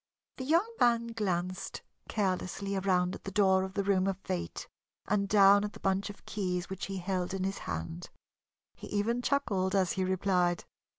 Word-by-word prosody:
The 260 - -4
young 335 +9 +3
man 235 -1 +3
glanced 185 -5 -2 0.3
carelessly 195 0 -1
around 185 -1 +1
at - - -8
the - - -4
door 190 -1 +4
of 190 0 -6
the 200 - +1
room 195 -1 +2
of 195 -1 0
Fate 85 - -4 0.4
and 200 -1 +1
down 200 0 +7
at 210 - -4
the - - -11
bunch 195 +1 0
of 200 - -11
keys 180 -3 -2
which 190 - -4
he 195 -1 -4
held 185 0 -2
in 190 - -2
his 195 +1 -2
hand. 80 0 -4 0.6
He - - -10
even 225 +4 0
chuckled 205 -9 0
as 190 -3 +3
he 190 - 0
replied. 185 -2 +1
195 Hz, 180 wpm, -31 LUFS, 185-205 Hz, 0.6 s, down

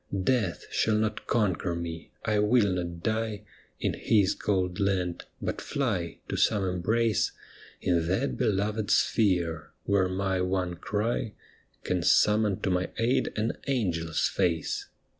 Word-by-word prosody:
Death 110 -7 0
shall 110 - +2
not 105 0 -1
conquer 95 -6 +1
me, 85 -1 -5 0.2
I 105 -2 +2
will 105 -2 +3
not 85 -1 -4
die 110 -2 -1 0.4
In - - 0
his 100 -3 +2
cold 90 -3 -1
land, 95 -3 0
but - - -3
fly 100 - -2
to - - -3
some 105 -3 +3
embrace 105 +5 +1 0.5
In 85 -2 +1
that 85 -8 0
beloved 105 - 0
sphere, 85 -7 +1
where 100 -2 +2
my 95 0 0
one 90 -1 0
cry 105 +5 -2 0.5
Can - - 0
summon 105 -2 +3
to 95 - 0
my 90 0 0
aid 125 +3 +1
an 110 +1 -1
angel's 85 - 0
face. 85 -3 -1
95 Hz, 135 wpm, -28 LUFS, 90-110 Hz, 0.5 s, will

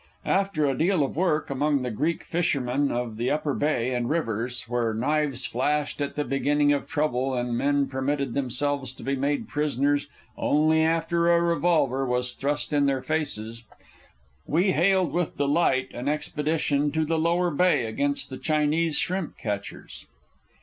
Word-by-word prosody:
After 195 -6 +1
a 135 -2 +1
deal 170 +3 +2
of 135 - -3
work 155 -4 0
among 140 0 +1
the 125 - -2
Greek 150 +10 -1
fishermen 140 -5 0
of 120 -2 -3
the 120 +3 0
Upper 150 -1 0
Bay 130 -4 0
and 120 -1 -1
rivers, 120 -6 -2
where 115 -2 -1
knives 140 +1 0
flashed 145 +4 -1
at 140 - -3
the 150 - 0
beginning 145 +2 +2
of 145 - -2
trouble 135 -4 0
and 120 -1 -1
men 140 +2 +1
permitted 135 -1 -2
themselves 135 0 -1
to - - -12
be 135 +1 0
made 140 +2 -1
prisoners 145 -1 0 0.3
only 155 +2 +2
after 165 +1 +1
a 170 - +5
revolver 165 -6 +2
was 125 -1 0
thrust 145 +2 -2
in 145 -1 +3
their 135 -2 0
faces, 115 -7 -3 0.8
we 180 +6 +2
hailed 180 -2 +2
with 175 -1 -1
delight 140 -3 +2
an 125 +3 -5
expedition 150 -1 0
to 160 0 +1
the 160 +1 0
Lower 170 +2 +1
Bay 175 -4 +2
against 140 +6 -1
the 130 - -6
Chinese 155 +1 +1
shrimp 185 -2 -2
catchers. 105 -4 -6
145 Hz, 160 wpm, -26 LUFS, 130-160 Hz, 0.8 s, a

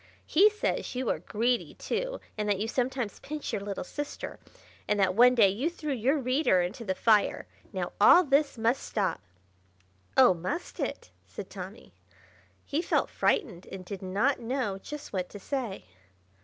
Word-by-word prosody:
He 395 +7 +6
says 425 -10 -2
you 255 -2 0
are - - -2
greedy, 235 +3 -1
too, - - -3 0.2
and 210 -1 -2
that 205 - +2
you 210 +3 -2
sometimes 250 -2 -2
pinch 300 0 -5
your 200 - -1
little 200 -1 -4
sister, 290 +10 -6 0.5
and 210 - +1
that 190 -2 +3
one 245 +4 +6
day 215 -5 +6
you 240 - -1
threw 305 -4 -4
your 260 +5 +1
reader 255 -5 +2
into 190 +8 -2
the 190 -4 -1
fire. 215 -1 +3 0.3
Now, - - -3
all 360 - +8
this 285 -2 +2
must 230 +4 +1
stop." 200 -3 -1 1.0
"Oh, 255 -7 +8
must 180 - -5
it?" - - -4 0.2
said 200 - -8
Tommy. 190 - -9 0.7
He 300 - -1
felt - - 0
frightened, 180 - 0
and 190 -1 -7
did 195 0 -6
not 205 +9 +1
know 235 -5 -2
just 295 +5 -8
what 185 -2 -2
to 205 - -9
say. 240 -3 -4
230 Hz, 170 wpm, -29 LUFS, 195-275 Hz, 1.0 s, all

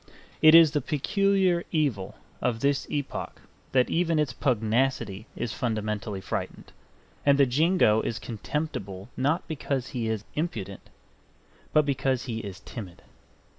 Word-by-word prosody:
It 155 +1 +8
is 165 -3 +8
the 150 -1 0
peculiar 185 +5 +1
evil 135 - 0 0.3
of 115 -2 0
this 140 -1 +1
epoch 145 -2 -4 0.3
that 130 -1 +3
even 170 -1 +2
its 150 -2 +1
pugnacity 115 -4 0
is 115 -2 -3
fundamentally 105 -4 -2
frightened; - - -5 0.5
and 140 -1 +5
the 140 - +6
Jingo 135 - +3
is 115 - -3
contemptible 105 -5 -4
not 145 +7 0
because 140 -4 -3
he 115 -3 -2
is 110 -2 -2
impudent, 105 - -4 0.8
but 155 -1 +4
because 135 -2 0
he 115 -3 -4
is 100 -2 -7
timid. 100 -4 -9
130 Hz, 135 wpm, -27 LUFS, 110-150 Hz, 0.8 s, It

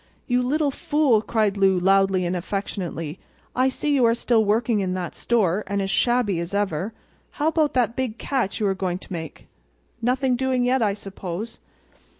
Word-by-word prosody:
"You 250 0 +1
little 285 +3 +1
fool!" 275 -5 +2
cried 215 -3 0
Lou, 195 -1 +4
loudly 195 0 +3
and 175 +1 -1
affectionately. 175 -3 -4 0.4
"I 255 +1 +3
see 290 +3 -1
you 270 -3 +3
are 230 - +3
still 235 -2 +2
working 220 +1 +1
in 185 -2 -1
that 180 -2 -4
store, 210 -4 +1
and 200 +1 -1
as 195 0 -1
shabby 240 -7 +2
as 170 +3 -4
ever. 190 -5 0
And 220 - -6 0.4
how 295 - -1
about 310 -3 +1
that 240 -2 +2
big 250 -4 -2
catch 260 -8 -2
you 215 - 0
were 195 - +2
going 185 -2 -2
to 190 - -10
make—nothing 165 - -4
doing 260 -1 +1
yet, 255 +1 +2
I 205 -3 +1
suppose?" 195 +1 -6
210 Hz, 180 wpm, -23 LUFS, 190-250 Hz, 0.4 s, Lou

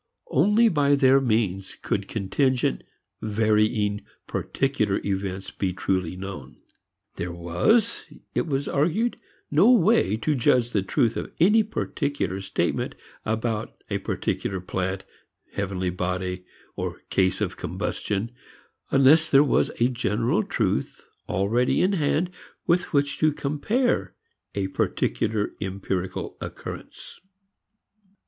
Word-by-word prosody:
Only 215 +4 +5
by 145 -7 +3
their 135 -1 +5
means 105 -6 0
could 100 -1 -2
contingent, 120 - 0 0.4
varying 105 -1 +1 0.2
particular - - 0
events 95 -1 -3
be 95 -2 -2
truly 95 -2 -1
known. 90 -8 -8 0.6
There 85 0 -3
was, 85 - +1 0.3
it - - 0
was 140 -1 -1
argued, 175 +12 +1 0.3
no 160 +10 +6
way 165 - +4
to 150 +7 0
judge 120 -2 +2
the 100 - +1
truth 110 +4 +1
of - - -4
any 210 +7 +6
particular 145 - -2
statement 95 0 -1 0.3
about 110 0 -2 0.2
a - - 0
particular 95 - -2
plant, 95 +1 -3 0.5
heavenly 95 -2 -2
body, 90 0 -3 0.3
or - - -4
case 95 -2 +2
of - - -2
combustion 105 +3 -3 0.6
unless 145 +4 +5
there 140 +1 +7
was 145 - +2
a 120 - +5
general 120 - 0
truth 110 - -1 0.2
already 110 +7 +2
in 190 +2 +3
hand 170 +1 +1 0.3
with 175 +1 +1
which 140 -1 +1
to 155 0 +4
compare 150 - 0 0.4
a 100 -1 0
particular 105 +2 0
empirical 95 -1 -3
occurrence. - - -8
110 Hz, 115 wpm, -25 LUFS, 95-145 Hz, 0.6 s, there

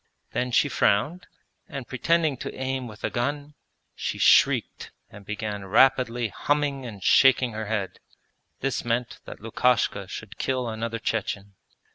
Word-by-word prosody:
Then 125 0 -1
she 125 +4 +3
frowned, 145 - +1 0.4
and 135 -5 -6
pretending 160 +2 +1
to - - -5
aim 130 -1 -3
with 105 -1 -12
a - - -1
gun, 145 +4 -2 0.4
she - - -4
shrieked - - +3 0.2
and 100 0 -12
began 105 -1 -4
rapidly 120 +2 +3
humming 140 +3 -1
and 100 -5 -9
shaking 130 -2 +5
her 110 -1 -5
head. 100 -3 -3 0.6
This 135 0 -1
meant 120 -1 -2
that - - -10
Lukashka 115 -3 +1
should - - -9
kill 130 -2 -1
another 115 +1 -3
Chechen. 105 -3 -3
120 Hz, 140 wpm, -25 LUFS, 110-135 Hz, 0.6 s, shaking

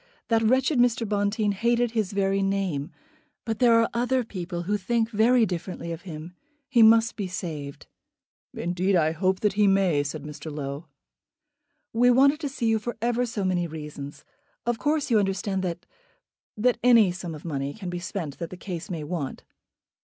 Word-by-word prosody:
That 225 -1 +3
wretched 260 +4 +2
Mr. 240 -2 +2
Bonteen 205 +1 0
hated 235 +3 +1
his 220 -5 -1
very 195 0 +1
name. 195 -7 -1 0.6
But 225 -2 -3
there 235 -2 +5
are 230 - +3
other 250 +2 +1
people 175 -5 -5
who 205 +4 0
think 225 +3 0
very 230 +2 +4
differently 175 -2 -5
of 165 0 -6
him. 160 +2 -8 0.3
He 245 -4 +3
must 225 0 +6
be 200 -3 -3
saved." 155 -6 -6 0.7
"Indeed 180 +3 0
I 160 -2 +3
hope 185 +4 0
he 205 0 +3
may," 190 -6 +3
said 145 +1 -5
Mr. 150 +1 -8
Low. 145 +2 -5 1.1
"We 245 +2 +4
wanted 275 +4 +5
to 295 -3 -3
see 260 -3 -4
you 225 -1 +3
for 240 +2 -5
ever 240 +2 0
so 215 -3 -3
many 180 -2 0
reasons. 150 -2 -8 0.4
Of 240 -1 0
course 295 -3 0
you 220 - +5
understand 195 0 -1
that 175 -1 -4 0.7
that 245 +3 +2
any 230 -6 +6
sum 175 -2 -6
of 150 - -12
money 140 -3 -2
can 190 -5 -6
be 175 - -3
spent 175 -6 -5
that 170 -2 -4
the 185 - -9
case 180 -2 -6
may 165 -4 -4
want." 150 -3 -4
195 Hz, 175 wpm, -26 LUFS, 170-230 Hz, 1.1 s, must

